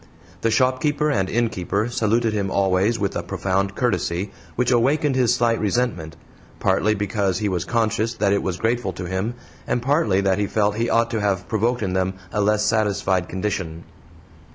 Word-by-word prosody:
The 115 - +2
shopkeeper 130 +6 +1
and 95 -8 0
innkeeper 110 -2 0
saluted 115 -1 +1
him 100 -2 -1
always 95 +4 +2
with 100 -3 -2
a - - -1
profound 95 +1 -1
courtesy 95 -5 -1 0.2
which 125 +1 +1
awakened 135 +4 +2
his 125 -2 +3
slight 115 -2 +1
resentment, 100 -8 -1 0.4
partly 110 +1 +2
because 100 -2 -1
he 105 - -1
was 90 -3 -1
conscious 115 +2 0
that 100 -2 +2
it 100 - +1
was 90 -2 -2
grateful 115 -3 -1
to 90 +1 -6
him, 95 +6 -2 0.3
and - - +1
partly 120 - +2
that 95 0 +1
he 100 - 0
felt 105 0 +1
he 115 +1 0
ought 115 0 +2
to 110 -2 -1
have 95 -3 0
provoked 115 +2 0
in 95 -2 -1
them 95 0 0 0.2
a 105 - 0
less 105 +1 +2
satisfied 100 -4 +1
condition. 90 -4 -3
105 Hz, 175 wpm, -22 LUFS, 95-115 Hz, 0.4 s, his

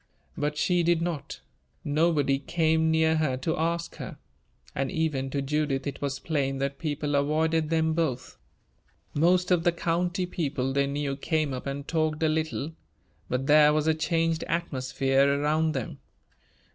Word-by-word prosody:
But 150 0 -2
she 175 +4 +2
did 170 0 +2
not. 165 -5 -4 0.4
Nobody 145 -3 +2
came 160 +2 +1
near 160 0 +3
her 145 -5 0
to 145 +5 -1
ask 170 +1 -2
her; - - -7 0.6
and 135 -1 -1
even 150 -5 -1
to 140 0 -2
Judith 140 -1 -1
it 140 -2 -5
was 140 -1 -2
plain 140 -4 -1
that 140 +1 -3
people 150 -1 -2
avoided 155 +2 +1
them 160 -1 +2
both. 155 -7 -2 0.7
Most 180 +4 +3
of 175 -2 +3
the 175 - +4
county 175 +2 -1
people 140 -7 -2
they 140 0 +2
knew 140 0 -2
came 155 0 -1
up 130 +2 -5
and 140 +1 -5
talked 155 -1 0
a 160 - +3
little, 155 0 -2 0.6
but 125 +1 -1
there 150 +1 +6
was 155 0 +1
a 160 - +4
changed 165 +1 0
atmosphere 135 -3 +1
around 155 +2 +1
them. 130 -4 -4
155 Hz, 160 wpm, -27 LUFS, 140-160 Hz, 0.7 s, there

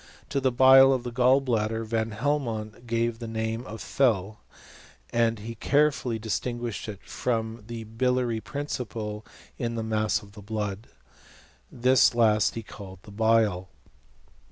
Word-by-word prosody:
To 140 - -1
the 130 -1 +2
bile 135 +2 +7
of 130 -2 -1
the 120 - -5
gall 130 +3 +4
bladder, 115 -3 -1
Van 110 0 -1
Hel 145 +8 0
mont 110 -2 -6
gave 115 0 -1
the 115 - -6
name 110 +1 -3
of 110 0 -8
fel, 110 -6 +1 0.7
and 115 -1 +2
he 110 +3 -7
carefully 140 -1 +1
dis 110 -2 -2
■ - - -21
tinguished 120 -6 -4
it 100 -2 -8
from 115 -2 -3
the 115 -1 -6
biliary 120 +1 0
principle 110 -7 -5 0.4
in 115 -1 -2
the 115 - -2
mass 110 -1 0
of 100 - -15
the 105 0 -12
blood. 105 0 -4 0.8
This 125 0 +4
last 110 -4 +3
he 115 - -5
called 95 -3 -11 0.2
bile. 110 -5 +2
115 Hz, 155 wpm, -26 LUFS, 110-125 Hz, 0.8 s, bile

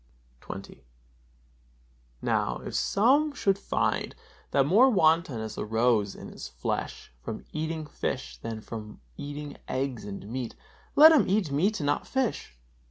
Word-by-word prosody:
XX. 95 -6 -8 1.4
Now, - - +1
if - - -5
some 250 +9 +4
one 295 - -6
should 195 -7 +1
find - - -1 0.3
that 135 -1 +3
more 220 - +6
wantonness 160 - +2
arose 110 -2 +1
in - - -9
his - - -8
flesh - - -4
from 110 - -6
eating 160 0 -3
fish 135 -3 -4
than 115 -1 -5
from 105 -1 -8 0.2
eating 145 0 -6
eggs 130 -3 -2
and 100 0 -7
meat, 120 +1 -4 0.4
let 310 +2 +10
him 310 -10 +4
eat 195 -6 +1
meat 190 +9 +1
and - - -2
not 145 0 0
fish. 245 - -2
145 Hz, 140 wpm, -28 LUFS, -, 1.4 s, let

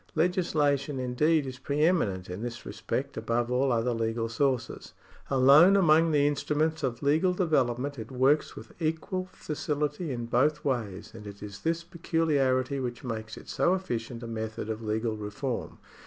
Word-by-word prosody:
Legislation, 155 -5 +1
indeed, 140 +5 +1
is 130 -1 -7
pre 140 +3 -2
eminent 100 - +1
in 90 +3 -6
this 120 0 -6
respect - - -4
above 120 +1 -1
all 130 +2 +2
other 120 +1 +1
legal 115 0 -1
sources. 130 +2 -1 0.4
Alone 140 +8 +7
among 165 -2 +5
the 145 -2 +3
instruments 150 +2 0
of 125 0 -3
legal 160 +6 +3
development, 140 -6 0
it 110 - -7
works 135 +4 +2
with - - -10
equal 165 +4 -1
facility 150 +1 -3
in 120 -2 -3
both 135 +6 +1
ways; 110 -8 -2
and 110 -2 -10
it 100 0 -10
is 105 -1 -8
this 165 +4 -1
peculiarity 145 -6 0
which 120 -2 -4
makes 110 -3 -5
it - - -12
so 180 - +2
efficient 120 -9 -4
a - - -5
method 110 -1 -4
of 110 +1 -5
legal 110 +1 -1
reform. 105 +5 -4
135 Hz, 160 wpm, -28 LUFS, 115-155 Hz, 0.4 s, Alone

